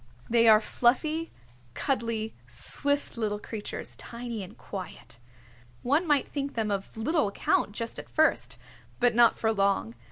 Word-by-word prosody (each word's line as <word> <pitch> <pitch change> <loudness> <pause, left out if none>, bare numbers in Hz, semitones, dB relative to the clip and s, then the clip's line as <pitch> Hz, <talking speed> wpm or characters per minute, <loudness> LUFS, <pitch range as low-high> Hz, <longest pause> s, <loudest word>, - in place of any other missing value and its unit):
They 230 -1 +5
are 215 -1 +8
fluffy, 305 +9 +1 0.5
cuddly, 230 -4 -1
swift 285 - 0
little 210 -2 -1
creatures, 210 0 -6
tiny 235 -2 -5
and 190 +2 -10
quiet. 185 - -8 0.6
One 295 +7 +2
might 290 -3 +3
think 280 -1 -4
them 220 -2 0
of 195 +2 -4
little 300 +2 +1
account 200 0 0
just 230 +1 -3
at - - -10
first, 315 0 +2 0.4
but 245 -1 +4
not 235 0 +5
for 225 0 +1
long. 195 - +1
230 Hz, 140 wpm, -28 LUFS, 210-275 Hz, 0.6 s, are